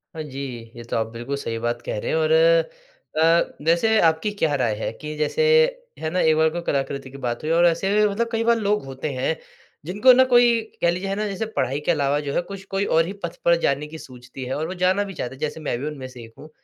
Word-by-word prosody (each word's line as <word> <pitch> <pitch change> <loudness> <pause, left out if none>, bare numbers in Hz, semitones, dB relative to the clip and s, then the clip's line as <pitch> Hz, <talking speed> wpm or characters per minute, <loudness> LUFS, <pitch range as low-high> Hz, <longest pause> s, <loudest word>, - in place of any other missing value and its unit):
हाँ 160 - -4
जी, 140 -2 -8 0.4
ये 120 - -9
तो 120 - -5
आप 110 -1 0
बिल्कुल 120 +4 -4
सही 115 -4 -4
बात 120 +1 -2
कह - - -3
रहे - - -4
हैं 485 - +1
और 480 0 +1
अ, - - +2
वैसे 195 +7 +3
आपकी 160 +5 +2
क्या 155 -2 +2
राय 120 -5 0
है 110 - -3
कि 150 0 -5
जैसे 155 - 0 0.6
है 155 - -2
ना 180 - -1
एक 160 -2 +4
बार 160 0 +3
को 175 +2 -4
कलाकृति 140 -3 -3
की 140 - -10
बात 120 +4 -3
हुई 155 - -1
और 170 +1 +4
ऐसे 180 +4 +1
भी 210 0 +4
मतलब 230 +4 -1
कई 225 -1 0
बार 235 0 +3
लोग 210 -5 0
होते 135 +2 -5
हैं 135 +5 -1 0.5
जिनको 210 +9 +5
ना 260 +1 +6
कोई 240 -2 +4 0.2
कह 170 - +4
लीजिए 180 +3 -3
है 195 - -1
ना, 210 +1 -2
जैसे 200 +2 -3
पढ़ाई 135 +3 0
के - - +3
अलावा 145 -2 +1
जो 145 -1 -4
है - - +1
कुछ 195 +2 -9
कोई 195 +1 0
और 165 -3 +3
ही 190 - -5
पथ 170 - -4
पर 170 - +6
जाने 140 +2 0
की 160 +1 -9
सूझती 130 -2 -10
है 130 - -3
और 155 +2 -2
वो 180 - -5
जाना 190 +2 +3
भी 195 -1 -7
चाहते 130 -6 -5
हैं - - -18
जैसे 155 +1 -3
मैं 145 -6 -2
भी 145 - -4
उनमे 140 -4 -6
से 125 -2 -11
एक 115 0 -14
हूँ। 155 - -12
160 Hz, 265 wpm, -23 LUFS, 140-205 Hz, 0.6 s, ना